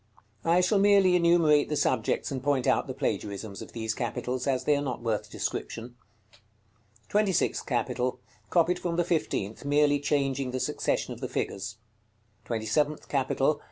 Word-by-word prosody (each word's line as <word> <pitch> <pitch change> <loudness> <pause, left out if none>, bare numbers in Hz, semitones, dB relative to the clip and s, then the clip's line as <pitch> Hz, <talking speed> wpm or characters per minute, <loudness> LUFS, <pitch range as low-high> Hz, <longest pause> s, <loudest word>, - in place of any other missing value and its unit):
I 170 +2 +4
shall 190 +3 +3
merely 195 -2 +5
enumerate 170 -4 +4
the 150 - 0
subjects 130 -3 0
and 130 -2 -3
point 135 -2 +1
out - - +2
the 130 - -4
plagiarisms 105 -6 -3
of - - -10
these 110 -1 -2
capitals, 125 +3 -3
as 130 -2 +1
they 150 - +3
are 140 - 0
not 130 -4 -4
worth 110 -3 -1
description. 115 +2 -4 0.4
§ - - -22
CXXV. 110 +1 -36
TWENTY 210 -1 +2
SIXTH - - 0
CAPITAL. 125 0 -1 0.3
Copied 175 +1 +2
from 170 -2 -2
the 175 - +2
fifteenth, 150 - -2
merely 145 0 +3
changing 140 -2 0
the 130 +1 -3
succession - - -1
of - - -12
the - - -3
figures. 100 +2 -3 0.7
TWENTY 110 -1 -3
SEVENTH 150 +4 0
CAPITAL. 135 +2 +1
135 Hz, 170 wpm, -28 LUFS, 115-155 Hz, 0.7 s, merely